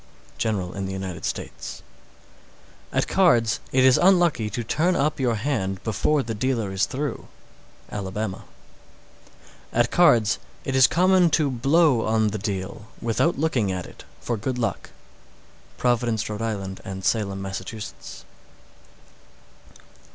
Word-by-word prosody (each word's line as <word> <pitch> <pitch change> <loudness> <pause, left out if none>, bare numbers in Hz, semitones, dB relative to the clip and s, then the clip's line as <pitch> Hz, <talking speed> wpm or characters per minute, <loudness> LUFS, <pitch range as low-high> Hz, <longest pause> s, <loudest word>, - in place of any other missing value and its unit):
General 100 -6 -1
in 95 -1 -4
the 95 - -4
United 95 -4 -5
States. - - -5 1.1
610. - - -4
At - - +2
cards, 120 -12 +3
it 130 0 +3
is 130 -1 +6
unlucky 175 - +3
to 115 +3 -3
turn 170 +10 +1
up 150 +1 0
your 125 -3 +1
hand 105 -6 -2
before 135 +7 +1
the 115 - -4
dealer 115 -3 -1
is 95 +1 +1
through. 145 -1 -4 0.6
Alabama. 100 0 -4 1.2
611. - - -2
At 120 - -5
cards, 115 -11 +4 0.3
it 135 - -2
is 130 -1 +7
common 185 0 +4
to 150 -3 +2
blow 135 +1 +3
on 110 -1 +2
the 105 0 -4
deal, 100 +1 -4
without 120 +9 +1
looking 135 -10 +1
at 90 -1 -3
it, - - -13 0.2
for 120 - -2
good 125 +4 -3
luck. 115 -2 -2 0.9
Providence, 120 -3 +1
R.I., 110 +1 -2 0.3
and 95 0 -6
Salem, 100 -3 0
Mass. 95 0 -4
DAYS. 110 -2 -9
115 Hz, 135 wpm, -24 LUFS, 100-135 Hz, 1.2 s, is